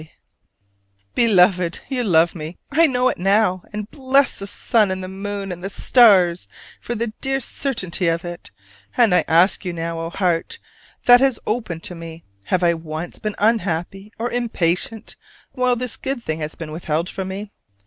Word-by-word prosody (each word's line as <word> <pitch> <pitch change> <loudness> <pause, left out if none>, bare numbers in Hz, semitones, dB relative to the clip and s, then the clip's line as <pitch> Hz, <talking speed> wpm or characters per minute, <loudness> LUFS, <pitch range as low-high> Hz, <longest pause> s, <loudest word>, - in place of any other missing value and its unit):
K. 155 - -15 1.0
Beloved: 180 -6 +3
You 255 -3 -1
love 170 -5 +3
me! 160 0 -7
I 325 +4 +5
know 250 -2 +1
it - - -4
now, 195 -1 +2
and 210 -1 -5
bless 270 0 +2
the 200 - -6
sun 215 0 +1
and 190 0 -3
the - - -5
moon 195 +1 -5
and 175 0 -7
the 195 - -3
stars 190 -6 +4 0.3
for 240 - -4
the 230 0 -3
dear 270 0 +1
certainty 195 -9 -2
of 165 +1 0
it. 175 0 -8 0.5
And 230 -6 +5
I 180 -3 +4
ask 175 +6 +3
you 180 -2 -3
now, 165 0 -4
O 165 0 -4
heart 180 - -1 0.5
that 245 0 +8
has 265 -3 +2
opened 210 -8 -3
to - - -4
me, 165 -1 -9 0.2
have 180 - 0
I 170 -1 +4
once 160 +1 -6
been 215 -1 -4
unhappy 195 -2 -1
or 240 +2 -3
impatient 220 -3 -2 0.3
while 250 -1 +1
this 250 0 -3
good 265 -3 -4
thing 160 -5 -3
has 155 0 -5
been 160 -2 -7
withheld 160 +1 -2
from 190 0 -5
me? 200 +2 -6
190 Hz, 180 wpm, -21 LUFS, 170-230 Hz, 1.0 s, that